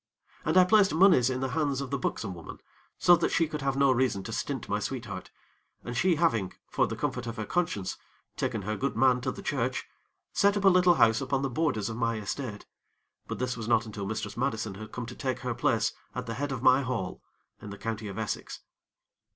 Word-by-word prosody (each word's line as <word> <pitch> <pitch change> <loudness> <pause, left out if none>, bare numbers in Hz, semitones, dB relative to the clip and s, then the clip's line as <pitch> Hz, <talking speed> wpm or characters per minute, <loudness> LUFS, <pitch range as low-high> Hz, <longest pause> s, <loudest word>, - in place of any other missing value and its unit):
And - - +2
I 185 - +9
placed 195 -2 +4
monies 165 -9 +6
in 130 0 -2
the 135 - -1
hands 140 -1 0
of 140 -2 -5
the 140 - -1
buxom 105 -5 -2
woman, 85 -2 -9 0.4
so 175 - +6
that 165 - +1
she 165 - +2
could 150 -1 -5
have 135 0 0
no 140 -1 +5
reason 125 -6 +1
to - - -6
stint - - -3
my - - 0
sweetheart, - - -5 0.5
and 120 - -5
she 175 +7 +3
having 130 - +1 0.2
for - - +2
the - - -4
comfort - - -3
of 115 - -5
her 110 - -3
conscience 155 - -1 0.4
taken 105 - -2
her 105 +3 -2
good 135 +6 -2
man 125 -2 +4
to 130 +1 -1
the - - -9
church, - - -1 0.5
set 200 +1 +3
up 200 - -1
a - - +9
little 180 -1 +5
house 115 -1 +4
upon 135 0 -1
the 135 - -1
borders 120 -8 0
of 115 - -4
my 115 -2 0
estate; 105 +1 -5 0.6
but - - -4
this 125 0 -1
was 115 -2 -6
not 115 -1 +3
until 105 -2 -5
Mistress 105 -1 -4
Madison 115 -5 -1
had 110 +3 -9
come 125 - -5
to 120 +1 -8
take 130 -3 -3
her 125 -1 -2
place - - +1 0.2
at - - -3
the 115 - -4
head 145 +3 -3
of 130 -2 -4
my 130 +1 +6
hall 125 -8 -3 0.4
in 105 - -8
the 100 - -7
County 110 0 -4
of 100 - -7
Essex. 110 -1 -4
125 Hz, 225 wpm, -29 LUFS, 110-140 Hz, 0.6 s, I